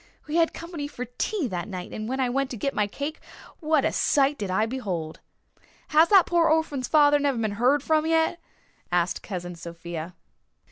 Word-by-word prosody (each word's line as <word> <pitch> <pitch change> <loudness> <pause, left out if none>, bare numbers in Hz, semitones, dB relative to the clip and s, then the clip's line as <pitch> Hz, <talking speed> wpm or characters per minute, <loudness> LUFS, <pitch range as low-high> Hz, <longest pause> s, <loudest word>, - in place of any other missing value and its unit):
We 305 +2 -2
had 330 -1 +3
company 335 -4 -6
for 250 -3 -6
tea 405 - 0
that 175 -2 -4
night 185 -3 -7
and 215 +1 -5
when 265 +1 -2
I 260 - +2
went 270 +2 -1
to 245 - -6
get 275 +7 -2
my 210 - +1
cake 285 +8 -5 0.4
what 310 -3 +2
a - - +2
sight 280 0 +2
did 200 -2 -3
I 190 +4 +2
behold!" 190 -10 -4 0.7
"Has 315 +2 +5
that 390 -4 +7
pore 340 -2 +3
orphan's 305 -5 0
father 290 -1 +5
never 280 -3 0
been 215 -3 -2
heerd 260 +4 +3
from 315 0 +2
yet?" 325 +1 +2 0.5
asked 175 0 0
Cousin 180 -3 -6
Sophia. 170 0 -7
265 Hz, 190 wpm, -25 LUFS, 195-310 Hz, 0.7 s, that